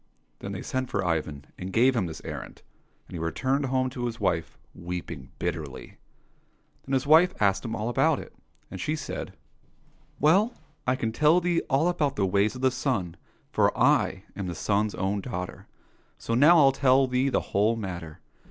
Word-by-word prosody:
— - - -44
Then - - -6
they - - -5
sent 130 -1 -3
for 100 -2 -1
Ivan, 75 -4 -2
and 90 +1 -5
gave 125 +6 +4
him 100 -7 0
this 80 - -8
errand, - - -7 0.4
and - - -14
he 85 - -5
returned 130 - -1
home 130 0 +1
to 120 -1 -3
his 115 0 -6
wife, 90 -6 -1 0.2
weeping 85 -6 -6
bitterly. - - -5 0.9
Then 135 - -3
his 130 0 +1
wife 160 +5 +5
asked 100 -1 +2
him 115 -1 -3
all 110 0 -3
about 120 - +2
it, - - -9 0.4
and 95 - -6
said, 155 +1 -4 0.4
" - - -35
Well, 195 - +3 0.3
I 130 - +3
can 115 -3 -2
tell 155 +8 +4
thee 175 -1 +1
all 140 +5 +3
about 150 -6 0
the 100 - +1
ways 100 +4 +1
of 125 - -7
the 130 0 +3
sun, 125 - -2 0.4
for - - +2
I - - +2
am 100 -2 -4
the 90 - -4
sun's 105 +4 0
own 100 +2 -1
daughter. 90 -5 -6 0.5
So 115 - -4
now 150 +8 +6
I'll 140 -4 +6
tell 135 0 +4
thee 130 +1 +1
the - - +1
whole 105 +3 +3
matter. 85 -7 -6
115 Hz, 190 wpm, -27 LUFS, 95-135 Hz, 0.9 s, now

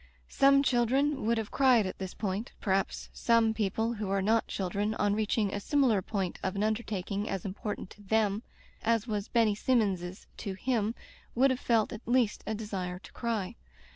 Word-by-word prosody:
Some 275 0 +5
children 265 +1 +2
would 235 0 +3
have 220 -2 -3
cried 255 -6 +4
at 185 - -5
this 190 -1 -5
point 205 +2 -3
— - - -33
^perhaps 195 -2 -1
some 230 -1 +3
people 220 +2 0
who 210 -3 -4
are 195 0 +1
not 225 +3 +2
children, 200 +3 -2
on 205 -2 +1
reaching 210 -1 0
a 205 - -1
similar 245 -3 +2
point 190 -2 -3
of 190 - -2
an 200 - 0
undertaking 210 -2 -2
as 195 -1 -3
important 200 0 -5
to 210 - -14
them 210 0 +1 0.4
as 230 -1 +1
was 210 -3 -2
Benny 225 -3 +3
Sinmions's 195 -6 0
to 200 - -4
him, 225 0 0 0.4
would 265 +3 +4
have 255 - -1
felt 225 -3 +1
at 220 - -7
least 240 -3 +2
a 220 - -1
desire 190 -4 -4
to 185 - -14
cry. 230 -2 -3
215 Hz, 185 wpm, -30 LUFS, 200-235 Hz, 0.4 s, Some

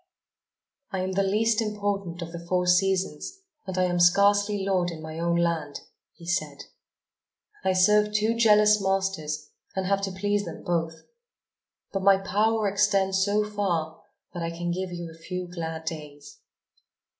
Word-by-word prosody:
"I 190 -3 -3
am 185 +1 -2
the 190 +1 +1
least 215 +3 +2
important 200 -5 -3
of 165 - -8
the 170 0 -8
four 180 -1 +1
seasons 190 - +1 0.3
and 190 -1 -4
am 180 -1 +1
scarcely 200 +3 +4
lord 185 -3 +1
in 165 -2 -7
my 155 +1 -7
own 170 0 +1
land," 165 -4 -1 0.3
he 170 - -14
said. 175 +2 -2 1.0
"I 190 - +2
serve 210 +3 +4
two 215 +2 +1
jealous 210 -2 +5
masters 190 -6 -2 0.2
and 190 -1 -1
have 195 +1 +1
to 195 -1 -2
please 205 +2 -1
them - - -8
both. 165 -2 -2 0.9
But 195 - -1
my 195 0 +6
power 210 +3 +1
extends 195 -1 +2
so 205 +1 +2
far 175 -7 -2 0.3
that 175 - -5
I 165 - -2
can 175 +1 -3
give 185 +1 -3
you 170 -1 -6
a 165 0 -16
few 180 +1 -5
glad 160 -2 -6
days." 145 -3 -8
190 Hz, 155 wpm, -26 LUFS, 170-205 Hz, 1.0 s, my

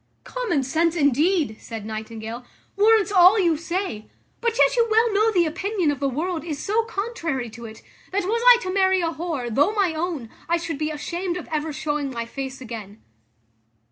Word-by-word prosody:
"Common 475 - -1
sense, 325 +5 +1
indeed," 295 - +2
said 225 -2 -8
Nightingale, 220 +2 -6 0.3
"warrants 425 -1 +4
all 370 +2 +7
you 345 -5 +3
say; 335 - -4 0.3
but 470 -1 -1
yet - - +4
you 470 -1 +3
well 445 0 +3
know 430 +2 +3
the 355 -5 +3
opinion 370 +1 -1
of 285 - -4
the 275 -1 0
world 325 +5 -2
is 315 -4 -4
so 430 +9 0
contrary 365 - -3
to 235 +1 -10
it, 220 -1 -11 0.3
that, 395 +1 0
was 450 +5 0
I - - +10
to 370 - -3
marry 380 -1 +3
a 330 -1 0
whore, 310 -8 -4
though 290 - +3
my 385 -5 +2
own, 315 -8 -4 0.2
I 340 - +3
should 330 -3 -5
be 305 0 -1
ashamed 345 +4 -3
of 355 - -8
ever 310 0 -1
showing 295 -1 -2
my 235 -3 -4
face 265 +2 -6
again." 220 -4 -8
330 Hz, 190 wpm, -23 LUFS, 270-390 Hz, 0.3 s, I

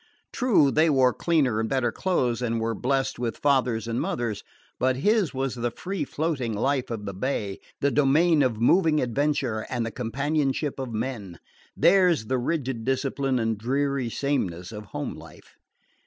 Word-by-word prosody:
True, 215 - +3
they 155 +3 +3
wore 130 -4 +4
cleaner 140 -10 +1
and 110 0 -1
better 130 -3 +1
clothes, 125 -6 0
and 115 -2 -1
were 115 0 -1
blessed 135 +4 -1
with 120 -2 -2
fathers 125 -5 +1
and 115 +1 -1
mothers; 115 -4 -2 0.4
but 130 0 +2
his 205 - +2
was 135 -1 -2
the 120 -1 -2
free 180 +5 -4
floating 140 -7 -2
life 130 +4 0
of 110 -3 -5
the 100 - -4
bay, 100 -2 -3 0.2
the 140 - +2
domain 150 +3 +4
of 125 -5 +1
moving 155 +5 +4
adventure, 125 -3 -1
and 120 -2 -1
the 115 - -4
companionship 140 +4 -1
of 130 -3 -4
men 110 -6 -4 0.4
theirs 175 - +4
the 130 +3 0
rigid 130 -4 -2
discipline 135 +1 0
and 115 -2 -1
dreary 135 +1 0
sameness 95 -10 -2
of 105 -1 -8
home 95 - -5
life. - - -14
130 Hz, 165 wpm, -25 LUFS, 115-145 Hz, 0.4 s, wore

